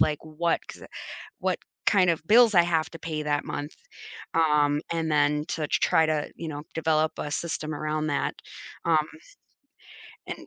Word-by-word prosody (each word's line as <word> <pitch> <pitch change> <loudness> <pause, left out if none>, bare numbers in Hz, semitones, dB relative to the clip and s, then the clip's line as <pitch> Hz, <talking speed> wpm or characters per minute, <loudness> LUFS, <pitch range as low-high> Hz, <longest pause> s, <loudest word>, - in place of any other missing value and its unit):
like, 150 - +3
what 160 +2 0
'cause, - - -10
uh - - -9 0.5
what - - 0 0.3
kind 185 -4 +4
of 165 - -3
bills 230 0 +7
I 175 - +7
have 165 -2 0
to 165 - -10
pay 155 -2 -4
that 145 -1 0
month, 145 +2 -5 0.6
um, 150 -2 +3
and 165 -1 -1
then 150 0 +2
to 155 -2 -2
try 160 - +3
to, 155 -2 -1
you 165 - -6
know, 145 -1 -6
develop 160 -1 +1
a 150 - -4
system 155 -1 -3
around 155 +1 -2
that, 145 - -1 0.5
um 155 -2 +3 1.2
and, - - -7
155 Hz, 165 wpm, -26 LUFS, 150-165 Hz, 1.2 s, bills